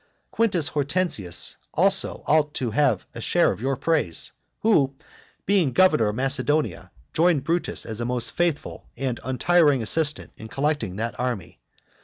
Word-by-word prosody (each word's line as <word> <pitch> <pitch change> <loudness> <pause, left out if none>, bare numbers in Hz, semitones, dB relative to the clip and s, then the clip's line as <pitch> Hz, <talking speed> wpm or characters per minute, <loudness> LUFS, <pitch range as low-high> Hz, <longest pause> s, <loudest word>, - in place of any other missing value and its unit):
Quintus 185 -9 +2
Hortensius 145 - -1 0.2
also - - +2
ought 150 -1 +2
to 125 -4 -2
have 120 -4 +1
a - - -7
share - - +2
of - - -7
your 135 +2 0
praise, 150 - 0 0.3
who, 145 -12 +3 0.5
being 180 -9 +2
governor 155 -10 +4
of 105 - -2
Macedonia, 140 +4 0 0.2
joined 165 -4 +2
Brutus 170 +1 -1
as 110 0 -5
a - - -2
most 125 -1 -2
faithful 170 -4 -2
and 130 -3 -2
untiring 145 0 +2
assistant 150 +5 +1
in 110 - -9
collecting 135 -6 -2
that 115 +3 -4
army. 115 -9 -4
140 Hz, 145 wpm, -24 LUFS, 120-160 Hz, 0.5 s, governor